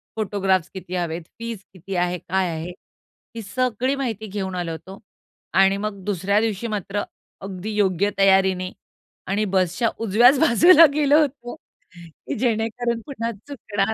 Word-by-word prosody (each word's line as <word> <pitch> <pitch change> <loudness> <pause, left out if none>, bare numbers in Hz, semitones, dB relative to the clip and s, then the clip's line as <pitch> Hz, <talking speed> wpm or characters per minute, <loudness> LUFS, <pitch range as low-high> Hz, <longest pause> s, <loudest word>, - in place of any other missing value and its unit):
Photographs 190 -4 0
किती 185 -1 -7
हवेत, 170 -1 -2 0.2
fees 230 -3 -5
किती 185 +1 -7
आहे, 180 0 0
काय 190 +1 -1
आहे 165 +2 -5 0.6
ही 230 - -5
सगळी 255 +4 -1
माहिती 225 -6 -4
घेऊन 190 -2 -4
आलो 175 -2 -3
होतो. 190 +4 -9 0.5
आणि 195 +1 +4
मग 200 -2 -5
दुसऱ्या 200 +1 +1
दिवशी 225 0 -2
मात्र 205 -1 -3 0.4
अगदी 195 +2 -6
योग्य 200 -1 +2
तयारीने 190 -1 +3 0.6
आणि 210 +2 +1
बसच्या 185 +5 +1
उजव्याच 235 +5 +4
बाजूला 325 +4 +7
गेलो 295 0 +4
होतो 255 -4 -3 0.4
की 170 -2 -9
जेणेकरून 230 0 -1
पुन्हा 235 -5 -4 0.2
चुकणार 220 -6 -2
200 Hz, 140 wpm, -22 LUFS, 185-230 Hz, 0.6 s, बाजूला